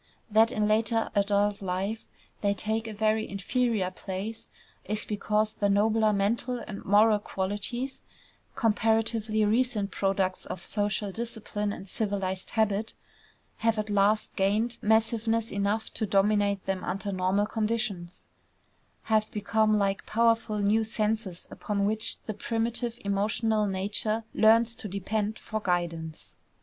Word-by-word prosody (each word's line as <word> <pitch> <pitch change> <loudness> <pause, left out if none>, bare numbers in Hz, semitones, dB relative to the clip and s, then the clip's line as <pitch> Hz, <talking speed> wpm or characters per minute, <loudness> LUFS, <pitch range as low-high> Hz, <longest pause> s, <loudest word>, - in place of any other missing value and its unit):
That 220 +2 +5
in 215 -3 +1
later 225 +1 +1
adult 205 0 +1
life 195 +4 -3 0.3
they 200 -1 +1
take 220 +3 -2
a - - -5
very 215 +1 0
inferior 205 0 0
place 195 +4 -6 0.3
is 215 +1 -2
because 210 +1 0
the 205 - 0
nobler 215 +2 +3
mental 220 +5 0
and 210 -4 -7
moral 210 +2 +5
qualities 205 +7 -3 0.5
comparatively 220 -1 +2
recent 220 -2 +1
products 195 -1 -1
of 185 - -5
social 205 -1 -1
discipline 215 -2 -3
and 195 - -8
civilized 195 -3 -2
habit 220 -1 0 0.6
have 225 0 +1
at 215 0 -2
last 205 +2 +2
gained 215 +5 +1
massiveness 225 +1 +1
enough 200 +2 -1
to 220 - -2
dominate 200 0 +2
them 190 -1 -2
under 195 +2 -3
normal 190 +2 +1
conditions; 215 -5 -2 0.8
have 215 -1 +1
become 215 0 +2
like 195 -1 0
powerful 230 -1 +2
new 210 +2 +2
senses 215 -4 -2
upon 200 -1 -2
which 220 +2 0
the 215 - -3
primitive 230 +2 -2
emotional 210 +2 +1
nature 205 +3 -1
learns 225 +1 +5
to 220 - -7
depend 205 +3 -2
for 220 - -4
guidance. 170 -4 -3
210 Hz, 130 wpm, -28 LUFS, 200-225 Hz, 0.8 s, That